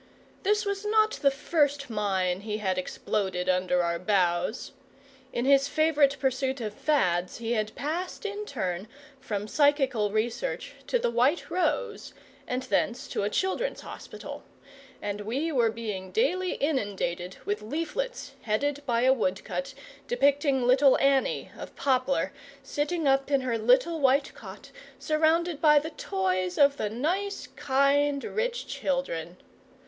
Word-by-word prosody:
This 420 +2 +1
was 400 0 -2
not 435 +1 +3
the 280 - +5
first 285 0 0
mine 195 -5 0
he 210 0 -3
had 190 -3 -1
exploded 185 -1 -2
under 180 -1 +2
our 170 0 -1
bows. 180 +1 0 0.6
In 240 - -2
his 275 0 +5
favourite 295 -2 +3
pursuit 265 0 0
of 215 -3 -4
fads 180 - +1
he 230 0 -4
had 215 -2 -1
passed 345 +8 -4
in 415 0 -4
turn 190 -6 -3 0.3
from 210 -5 -4
Psychical 270 -6 +2
Research 240 - -2
to - - +2
the 350 - 0
White 255 +8 +1
Rose 425 +5 -1 0.3
and 255 +1 -2
thence 250 +1 0
to - - -2
a 200 - 0
Children's 380 - -1
Hospital, - - -9 0.6
and 205 0 -3
we 265 +10 -2
were 240 -6 +3
being 210 -4 -5
daily 370 -6 +1
inundated 195 - -2
with 205 +1 -2
leaflets 330 - -4
headed 285 +7 -1
by 235 -1 +2
a 260 +1 +5
woodcut 260 +5 -2 0.3
depicting 275 +1 +2
Little 260 +2 +5
Annie 275 -1 +1
(of - - -9
Poplar) 265 0 +1 0.3
sitting 295 +3 -1
up 270 0 +2
in 275 -2 +2
her 250 -2 -1
little 255 +9 +3
white 275 0 +3
cot, - - -11 0.3
surrounded 320 +1 +1
by 300 -2 +6
the 310 +3 0
toys 185 - -1
of 280 0 +5
the 210 - -1
nice, 360 - -2
kind, 280 +1 +2
rich 480 +2 -2
children. 180 - -3
270 Hz, 140 wpm, -27 LUFS, 210-300 Hz, 0.6 s, by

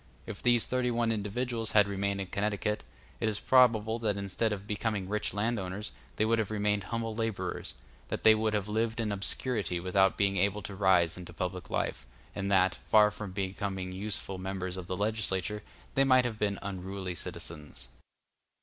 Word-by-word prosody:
If 105 -3 -7
these 120 -2 +4
thirty 125 -1 0
one 120 -1 +1
individuals 115 +2 -2
had 105 -2 +6
remained 100 0 -1
in - - -2
Connecticut, 105 +2 -1 0.4
it 110 - +1
is 105 - -1
probable 115 -3 +4
that 105 -3 0
instead 100 +3 0
of 100 -1 -4
becoming 105 -2 -2
rich 105 +2 -1
landowners 105 -2 -2 0.2
they 110 - +2
would 115 +1 +2
have 110 - 0
remained 105 -1 0
humble 115 0 -2
laborers, 105 -5 -3 0.3
that - - -4
they 110 - +9
would 110 0 +1
have 105 -1 -1
lived 110 +2 0
in 110 -2 0
obscurity 100 -1 -1
without 95 +2 +3
being 100 -1 +2
able 100 +2 +1
to 100 - -6
rise 90 -4 +3
into 90 -1 -9
public 90 0 -4
life, - - -2 0.3
and 100 0 -2
that, 95 -1 +4
far 105 -1 +4
from 105 -2 -6
becoming 95 -1 -3
useful 95 0 -3
members 95 -1 -3
of 90 -2 -7
the 95 - -3
legislature, 105 -1 -1 0.3
they 135 - +4
might 130 -2 +5
have 110 -3 -3
been 100 -1 0
unruly 95 -1 -4
citizens. 75 -5 -8
105 Hz, 175 wpm, -30 LUFS, 95-110 Hz, 0.4 s, they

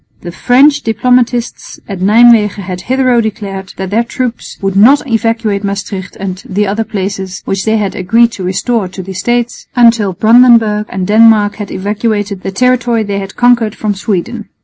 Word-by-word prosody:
The 175 - -7
French 275 - +3
diplomatists 245 +1 -1
at 195 -3 -6
Nijmwegen 210 0 +4
had 180 -1 -6
hitherto 255 +1 +1
declared 195 -3 -5
that 190 0 -5
their 225 +3 +1
troops 240 0 -5
would 195 -1 -2
not 255 +10 +5
evacuate 225 -3 -1
Maestricht 200 -1 -5
and 190 -1 -5
the 205 +2 0
other 210 +3 -1
places 195 -2 -5
which 195 0 -3
they 220 0 +1
had 205 -3 -2
agreed 230 +6 +2
to 195 - -7
restore 195 +3 -1
to 185 +1 -8
the 190 +1 -8
States, 240 +5 -2
until 230 -5 +3
Brandenburg 220 -1 +4
and 185 -1 -3
Denmark 215 0 +4
had 205 -2 -6
evacuated 205 0 -3
the - - -4
territory 240 0 +1
they 200 -1 -3
had 195 0 -8
conquered 240 -3 +2
from 210 -1 -2
Sweden. 205 +3 -4
215 Hz, 170 wpm, -12 LUFS, 195-235 Hz, -, not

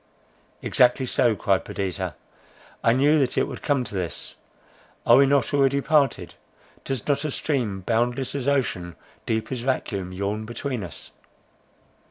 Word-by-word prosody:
"Exactly 125 +1 +3
so," 120 -2 +2
cried 90 - +1
Perdita, 95 -4 -4 0.7
"I 115 - +5
knew 145 +4 +4
that 130 -3 0
it - - +2
would - - -7
come 140 -3 +1
to 120 - -9
this! 90 -4 -4 0.7
Are 120 - +7
we 140 0 +6
not 140 +1 +2
already 140 0 +3
parted? 145 -1 +1 0.5
Does 135 -4 -4
not 145 0 +1
a 155 - -1
stream, 125 -10 -1
boundless 120 +5 0
as 140 -2 -3
ocean, 100 - 0 0.3
deep 110 +2 -1
as 130 - -2
vacuum, 105 -7 -2
yawn 100 +3 -3
between 120 0 -4
us?" 90 - -9
125 Hz, 150 wpm, -24 LUFS, 100-140 Hz, 0.7 s, Are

